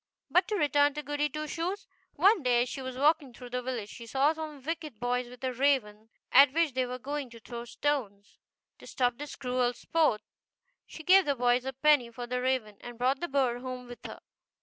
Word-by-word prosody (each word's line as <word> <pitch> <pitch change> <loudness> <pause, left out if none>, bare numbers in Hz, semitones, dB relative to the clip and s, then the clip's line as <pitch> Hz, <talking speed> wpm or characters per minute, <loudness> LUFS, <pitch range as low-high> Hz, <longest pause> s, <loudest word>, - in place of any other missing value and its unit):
But 360 - +4
to 430 - -1
return 290 -4 +3
to 300 - -4
Goody 290 +1 -1
Two 305 +2 -4
Shoes. 355 +6 -3 0.3
One 385 +5 +4
day 245 -2 +3
as 250 - -6
she 270 - -5
was 260 -1 -6
walking 290 -2 +2
through 245 -1 -11
the 250 0 -2
village 245 -5 -4
she 235 -2 -10
saw 275 +6 +2
some 310 -2 -7
wicked 310 -6 -5
boys 245 0 -1
with 250 +1 -14
a 260 -1 -1
raven, 230 -5 0 0.2
at 275 0 +7
which 330 -3 +2
they 255 0 0
were 250 +1 -5
going 280 +1 -4
to 230 0 -13
throw 235 +2 -8
stones. 230 -7 -3 0.4
To - - -13
stop 245 -1 0
this 295 0 -6
cruel 250 -1 0
sport 300 -6 +1 0.6
she 320 - -10
gave 380 +3 +6
the 285 -1 +1
boys 245 0 +2
a 265 - -3
penny 275 -2 +3
for 240 +1 -7
the 250 +1 -2
raven, 250 -5 -1
and 240 -1 -9
brought 260 +3 +1
the 345 - -3
bird 260 -4 0
home 255 -1 -6
with 245 0 -11
her. - - -10
260 Hz, 215 wpm, -29 LUFS, 245-295 Hz, 0.6 s, at